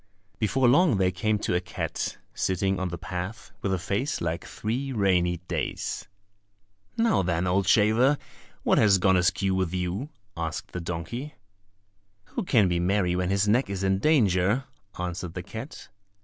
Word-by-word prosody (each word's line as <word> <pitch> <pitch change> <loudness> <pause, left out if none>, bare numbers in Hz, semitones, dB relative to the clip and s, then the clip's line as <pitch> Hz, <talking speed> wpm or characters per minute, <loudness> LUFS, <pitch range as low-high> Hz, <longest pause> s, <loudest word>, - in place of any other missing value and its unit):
Before 125 +4 +2
long 140 - +5
they 95 -1 +2
came 105 +4 0
to 100 - -2
a 90 - +2
cat, 90 -1 -4 0.2
sitting 95 +1 0
on 95 - -1
the 85 0 -5
path, 90 +5 -6
with 95 - -1
a 95 - +1
face 100 - -2
like 85 0 -3
three 125 +6 -3
rainy 90 -6 +2
days! 80 -6 -3 0.9
"Now 230 - +3
then, 85 -1 0
old 90 +1 +1
shaver, 115 +8 +4 0.5
what - - +3
has 100 -3 +5
gone 95 0 +3
askew 95 +2 +2
with 95 -1 0
you?" 90 +10 -2 0.3
asked 80 -1 -4
the 90 - -4
donkey. 90 - -5 0.9
"Who 240 - -3
can 115 - +4
be 85 -1 0
merry 90 0 +1
when 90 0 0
his 100 +1 +2
neck 120 +4 +3
is 100 -1 -3
in 95 0 +2
danger?" 105 - +3 0.3
answered 90 -1 -4
the 90 - -4
cat. 110 - -8
95 Hz, 165 wpm, -27 LUFS, 90-110 Hz, 0.9 s, long